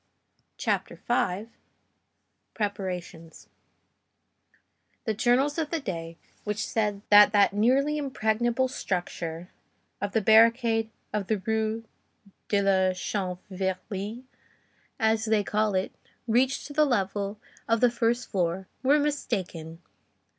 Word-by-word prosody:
CHAPTER -, -, -2 dB
V—PREPARATIONS 195 Hz, -5 st, -5 dB, 1.6 s
The 220 Hz, -, 0 dB
journals 260 Hz, +8 st, +2 dB
of 310 Hz, -2 st, -1 dB
the 330 Hz, -, -1 dB
day 165 Hz, -, -5 dB, 0.3 s
which 210 Hz, 0 st, -2 dB
said 210 Hz, -2 st, -1 dB
that 205 Hz, 0 st, +9 dB
that 200 Hz, -1 st, +4 dB
nearly 270 Hz, +8 st, +2 dB
impregnable 240 Hz, -2 st, 0 dB
structure, 175 Hz, -6 st, -4 dB, 0.5 s
of 205 Hz, 0 st, -3 dB
the 225 Hz, -, +2 dB
barricade 225 Hz, +1 st, +4 dB, 0.2 s
of 205 Hz, -3 st, -2 dB
the 220 Hz, -, +1 dB
Rue 220 Hz, 0 st, -1 dB, 0.6 s
de 200 Hz, -1 st, +2 dB
la 190 Hz, -1 st, +3 dB
Chanvrerie, 190 Hz, +3 st, -4 dB, 0.8 s
as 220 Hz, 0 st, +2 dB
they 215 Hz, -2 st, +2 dB
call 210 Hz, 0 st, 0 dB
it, 185 Hz, +1 st, 0 dB, 0.4 s
reached 255 Hz, +4 st, +2 dB
to 290 Hz, -, -8 dB
the 305 Hz, +1 st, +4 dB
level 200 Hz, -4 st, -1 dB, 0.3 s
of 230 Hz, 0 st, +2 dB
the 245 Hz, 0 st, +4 dB
first 240 Hz, +1 st, 0 dB
floor, 185 Hz, -1 st, -1 dB
were 275 Hz, +3 st, +4 dB
mistaken. 185 Hz, -, -3 dB
215 Hz, 110 wpm, -27 LUFS, 190-240 Hz, 1.6 s, that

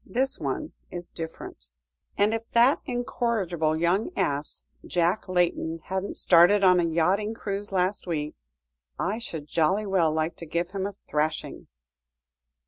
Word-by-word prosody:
This 265 Hz, +2 st, +1 dB
one 135 Hz, -4 st, -3 dB, 0.2 s
is 175 Hz, -1 st, -7 dB
different. 165 Hz, -, -7 dB, 0.5 s
And 205 Hz, +2 st, +3 dB
if 225 Hz, 0 st, -4 dB
that 240 Hz, +4 st, +5 dB
incorrigible 220 Hz, -10 st, -1 dB
young 180 Hz, -, +1 dB
ass, 145 Hz, +1 st, -2 dB, 0.2 s
Jack 180 Hz, +3 st, 0 dB
Layton, 175 Hz, -2 st, +1 dB
hadn't 190 Hz, +4 st, -4 dB
started 180 Hz, +4 st, +6 dB
on 180 Hz, -1 st, +6 dB
a -, -, +2 dB
yachting 185 Hz, +7 st, +1 dB
cruise 205 Hz, -2 st, -4 dB
last 185 Hz, +1 st, 0 dB
week, 150 Hz, -3 st, -2 dB, 0.6 s
I 215 Hz, +3 st, -1 dB
should 160 Hz, -10 st, -6 dB
jolly 185 Hz, +8 st, +1 dB
well 185 Hz, -5 st, +2 dB
like 155 Hz, +1 st, -1 dB
to 165 Hz, -, -8 dB
give 170 Hz, +3 st, -2 dB
him 195 Hz, 0 st, -2 dB
a 200 Hz, -, -8 dB
thrashing." 155 Hz, +1 st, -2 dB
180 Hz, 140 wpm, -26 LUFS, 165-205 Hz, 0.6 s, started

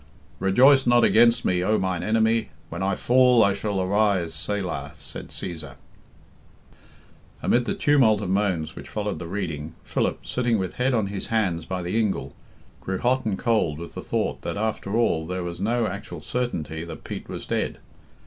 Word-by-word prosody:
"Rejoice 130 Hz, +8 st, +5 dB
not 120 Hz, -1 st, +5 dB
against 115 Hz, +1 st, +5 dB
me, 90 Hz, -1 st, +2 dB
O 105 Hz, +3 st, +2 dB
mine 95 Hz, -2 st, -1 dB
enemy. 110 Hz, +1 st, +2 dB, 0.2 s
When 85 Hz, +2 st, -5 dB
I 95 Hz, 0 st, +1 dB
fall 125 Hz, 0 st, +5 dB
I 100 Hz, -, +3 dB
shall 100 Hz, -1 st, -2 dB
arise. 95 Hz, -3 st, +1 dB
Selah," 90 Hz, +2 st, -3 dB
said -, -, -6 dB
Cæsar. 80 Hz, -7 st, -6 dB, 1.7 s
Amid 120 Hz, 0 st, +2 dB
the -, -, -1 dB
tumult 130 Hz, -8 st, +4 dB
of 100 Hz, -3 st, -4 dB
moans 95 Hz, -6 st, 0 dB
which -, -, -9 dB
followed 105 Hz, -2 st, -3 dB
the 85 Hz, -, -6 dB
reading, 80 Hz, -5 st, -4 dB
Philip, -, -, -2 dB
sitting 120 Hz, -2 st, +1 dB
with 95 Hz, -3 st, -4 dB
head 130 Hz, 0 st, +3 dB
on 110 Hz, -3 st, +1 dB
his 100 Hz, -, -4 dB
hand 95 Hz, -7 st, 0 dB
by 95 Hz, -1 st, -2 dB
the 90 Hz, +6 st, 0 dB
ingle, 105 Hz, -4 st, -1 dB, 0.5 s
grew 95 Hz, 0 st, -3 dB
hot 130 Hz, +5 st, +1 dB
and 100 Hz, -3 st, 0 dB
cold 110 Hz, -11 st, +1 dB
with 85 Hz, +1 st, -8 dB
the -, -, -6 dB
thought -, -, -2 dB
that -, -, -4 dB
after 110 Hz, -1 st, -2 dB
all 80 Hz, -9 st, +1 dB
there 90 Hz, 0 st, -3 dB
was 85 Hz, 0 st, -5 dB
no 115 Hz, +4 st, +1 dB
actual 100 Hz, -5 st, -5 dB
certainty 80 Hz, -8 st, -3 dB
that 85 Hz, -2 st, -9 dB
Pete -, -, -7 dB
was -, -, -6 dB
dead. -, -, -2 dB
100 Hz, 175 wpm, -25 LUFS, 90-115 Hz, 1.7 s, Rejoice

